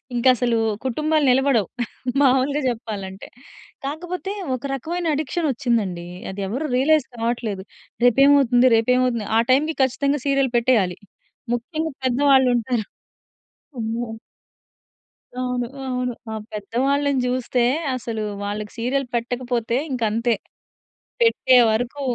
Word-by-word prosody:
ఇంక 240 - -2
అసలు 235 -1 +1 0.3
కుటుంబాలు 305 +3 +1
నిలబడవు. 255 -6 +2 0.5
మామూలుగా 270 +2 +3
చెప్పాలంటే 205 -5 -6 0.6
కాకపోతే 355 +5 -4 0.2
ఒక 255 - -9
రకమైన 340 +6 -4
అడిక్షన్ 310 +2 -1
వచ్చిందండి. 210 -8 -1 0.2
అది 200 - -6
ఎవరు 280 +8 -2
రియలైస్ 290 +2 +3
కావట్లేదు. 225 -4 -2 0.4
రేపేమవుతుంది. 260 0 +5
రేపేమవుతుంది. 245 -1 +1
ఆ - - +5
టైమ్‌కి 305 +4 +2
ఖచ్చితంగా 275 +2 0
సీరియల్ 275 -2 +2
పెట్టేయాలి. 225 -7 +2 0.6
ముఖ్యంగా 315 +5 -4
పెద్దవాళ్ళు 265 0 +4
ఉంటారు. 235 -2 -1 0.9
అమ్మో! 230 +1 -3 1.3
అవును. 250 -1 -1 0.2
అవును. 250 -1 -2 0.2
ఆ - - -4 0.2
పెద్దవాళ్ళని 270 +7 0
జూస్తే 250 0 0 0.3
అసలు 230 -3 -4 0.2
వాళ్ళకి 210 +1 -4
సీరియల్ 260 +4 0
పెట్టకపోతే 240 -1 -1 0.2
ఇంకంతే! 230 -1 +1 0.9
పెట్టే 455 - +4 0.2
వరకూ 245 +6 -2
250 Hz, 105 wpm, -22 LUFS, 230-275 Hz, 1.3 s, రేపేమవుతుంది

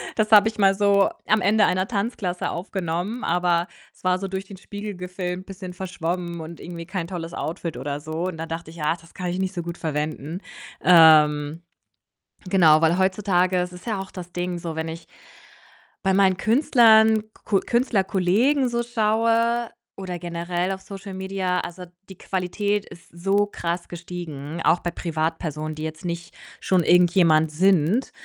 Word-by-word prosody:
Das 215 -1 0
habe 210 0 +8
ich 220 - -3
mal 195 -2 +5
so 200 0 +4 0.2
am 215 0 +3
Ende 210 +3 +4
einer 185 +1 +1
Tanzklasse 200 -4 -2
aufgenommen, 185 +4 -3
aber 175 0 +1 0.3
es - - -26
war 185 0 +3
so 195 - -4
durch 190 +1 -4
den 195 - -11
Spiegel 205 +2 -7
gefilmt, 180 0 -5
bisschen 185 -2 -8
verschwommen 175 -1 -4
und 160 +1 -9
irgendwie 170 -1 -7
kein 185 -2 -4
tolles 170 -2 -6
Outfit 165 0 -4
oder 145 0 -4
so. 155 +3 -4
Und 185 -3 -5
da 165 - -4
dachte 165 0 -6
ich, 165 -1 -10
ah, 150 +2 +2
das 165 0 -19
kann 180 - -5
ich 180 +1 -3
nicht 190 0 -1
so 175 - -3
gut 170 0 -6
verwenden. 155 +1 -3 0.4
Ähm, 155 -2 +6 0.9
genau, 160 -5 +5
weil 165 +2 +3
heutzutage 185 -1 +2
ist 180 0 -4
es 180 - -12
ja 220 -4 -2
auch 190 0 -7
das 180 -1 -9
Ding 175 0 -2
so, 165 -2 -5
wenn 160 0 -3
ich 165 0 -8 0.9
bei 190 -1 +1
meinen 190 -2 +4
Künstlern, 220 -3 +5 0.2
Ku 200 -2 +2
Künstlerkollegen 235 +3 +1
so 235 0 -1
schaue 230 +1 +1 0.3
oder 185 -2 -5
generell 175 +2 -3
auf 190 0 -5
Social 195 0 -9
Media, 190 -1 -2
also 180 +1 -7 0.2
die 190 - -11
Qualität 200 +2 -2
ist 170 - -14
so 195 +4 +1
krass 170 -3 -4
gestiegen, 170 -3 -7
auch 175 - +4
bei 175 - -3
Privatpersonen, 155 -2 -3
die 155 - -6
jetzt 155 +2 -6
nicht 170 0 -5 0.3
schon 185 -2 +2
irgendjemand 170 -3 +4
sind, 185 - +2
180 Hz, 170 wpm, -23 LUFS, 170-195 Hz, 0.9 s, habe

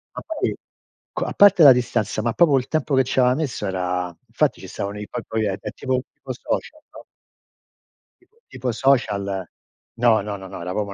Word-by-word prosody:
Ma - - -5
poi 320 -2 -2 0.6
qua - - -3
a - - -4
parte 200 -3 +6
la 140 - +11
distanza, 115 -4 -1
ma 115 +1 -1
proprio 150 -3 +4
il 125 - -2
tempo 155 -3 0
che 130 - +4
ci 130 - -1
aveva 125 0 +4
messo 140 -8 -3
era 90 -2 -2
infatti - - 0
ci - - -10
stavano 100 +1 -5
i 105 - -7
poi - - -6
poi 110 -1 -1
è 100 -2 -1 0.2
tipo 130 -1 -1
tipo 135 - -9
social, 310 - -4
no? - - -13 1.2
Tipo 450 - -32
tipo 125 - -3
social. 100 -8 +1 0.5
No, 115 -3 +4
no, 105 0 -5
no, 95 0 -10
no, 95 - -8
era 90 +1 -4
proprio 100 -1 -3
115 Hz, 200 wpm, -22 LUFS, 100-135 Hz, 1.2 s, la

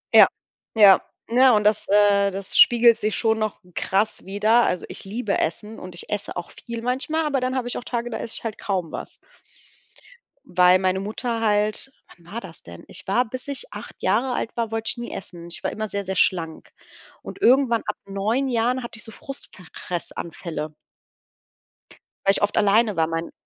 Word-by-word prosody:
Ja. - - +10 0.5
Ja, 200 -3 +8 0.3
ne, 250 +2 +6
und 210 -1 +3
das, 210 0 +2
äh, 200 -1 +4
das 195 0 -3
spiegelt 235 -1 +7
sich 215 0 -1
schon 225 -1 +1
noch 215 -1 -2
krass 200 +3 0
wieder. 215 +5 +3
Also, 180 - -1
ich - - -6
liebe 210 +1 -2
Essen 210 +7 -3
und 185 0 -9
ich 175 - -7
esse 205 -1 -4
auch 175 - -5
viel 235 -1 -7
manchmal, 270 +6 -1
aber 280 -3 +1
dann 255 +1 -1
habe 250 -2 -1
ich 245 - -3
auch - - -5
Tage, 240 -1 -3
da 225 - -4
esse 230 - -6
ich - - -8
halt 225 -2 -4
kaum 185 -5 -2
was. - - -7 1.3
Weil 180 -4 +5
meine 185 0 +1
Mutter 225 +4 -3
halt 210 +4 +1 0.3
wann 170 - -23
war 235 - -4
das 170 -4 -12
denn? 85 0 -11
Ich 185 - -8
war 200 +6 +3
bis 255 +3 -8
ich 285 - -4
8 - - -9
Jahre 250 +4 +2
alt 225 - -3
war, 230 -2 -1
wollte 225 0 -2
ich 245 - -2
nie 240 0 -6
essen. 170 -2 -8
Ich - - -8
war - - -1
immer 215 0 -4
sehr, 200 -1 -3
sehr 190 0 -4
schlank. 165 -3 0 0.5
Und 395 - -10
irgendwann 250 - +4
ab 210 - -2
9 215 +7 -1
Jahren 245 +1 +1
hatte 235 -1 -7
ich - - -7
so 225 - -10
Frustfressanfälle. 170 - -7 1.5
Weil 195 - +6
ich - - 0
oft 205 0 +1
alleine 215 0 +3
war, 160 -1 +2
mein 165 +1 -3
215 Hz, 195 wpm, -23 LUFS, 190-240 Hz, 1.5 s, Ja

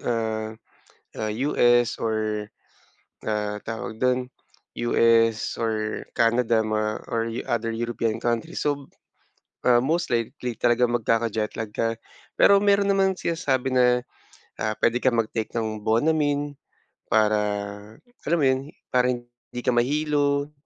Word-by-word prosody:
ah, 110 -1 -1 0.7
ah, 110 -1 -2
US 120 -2 +3
or 110 -1 -1 0.8
ah, 105 -1 -2
tawag 110 0 -6
do'n, 125 0 +1 0.6
US 115 -2 +3
or 110 -1 -1 0.2
Canada, 115 -1 +3
mga 110 0 0 0.2
or 115 0 0 0.2
other 115 -1 -1
European 115 -1 -1
countries. 120 -2 -2
So, 145 -2 -1 0.8
ah, 120 -1 +6
most 160 +6 0
likely 120 +1 -2
talaga 120 +1 +3
magkaka-jet 115 -2 0
lag 110 -2 -4
ka. 115 0 0 0.4
Pero 200 0 +6
meron 200 0 +3
namang 190 -1 +2
sinasabi 135 -6 -1
na 125 -1 +4 0.6
ah, 110 - -1
"Puwede 120 +1 +2
kang 125 -3 +2
mag-take 110 0 -2
ng 110 -2 -2
Bonamine 145 +4 +1 0.6
para, 110 -1 +4 0.9
alam 170 +3 +2
mo 140 - +3
yun, 130 0 +2 0.3
para 125 0 +3
hindi 120 0 -8
ka 125 - +3
mahilo." 145 +2 +1
120 Hz, 120 wpm, -24 LUFS, 110-130 Hz, 0.9 s, ah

